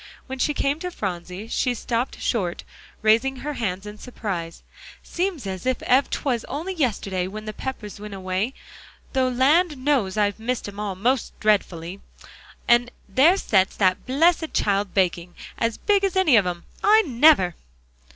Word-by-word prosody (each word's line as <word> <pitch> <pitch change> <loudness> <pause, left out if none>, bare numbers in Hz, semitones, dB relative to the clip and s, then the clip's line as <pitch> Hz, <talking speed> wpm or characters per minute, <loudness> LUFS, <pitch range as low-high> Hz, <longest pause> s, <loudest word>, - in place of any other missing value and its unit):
When 265 0 -7
she 295 +3 +1
came 280 +3 0
to 360 - -4
Phronsie, 185 - -5
she 245 +1 0
stopped 240 +2 -2
short, 185 -8 -1 0.4
raising 230 +5 +3
her 295 +3 -5
hands 195 -6 -3
in 210 0 -9
surprise. 185 -9 -5 0.4
"Seems 355 - -3
as 190 +4 -5
ef 260 +1 +2
'twas 245 -5 -1
only 335 +6 -4
yesterday 200 - -1
when 215 +3 -7
the 215 - -5
Peppers 210 -5 -6
went 210 -1 -7
away, 190 +6 -2 0.6
though 260 -2 +2
land 295 +6 +3
knows 255 -8 0
I've 205 0 +1
missed 240 0 -2
'em 205 0 -9
all 205 -2 -3
most 245 +6 -1
dretfully, 190 -4 0 0.7
'an 240 0 +4 0.2
there 280 - +4
sets 195 - +2
that 185 +2 +1
blessed 320 +4 +2
child 200 -1 0
baking, 175 -2 0 0.2
as 230 -1 0
big 405 -1 +2
as 390 -1 0
any 375 -9 +4
of 200 -4 +4
'em. 175 -1 -4 0.2
I 435 +2 +6
never!" 260 - +4
230 Hz, 160 wpm, -23 LUFS, 195-275 Hz, 0.7 s, I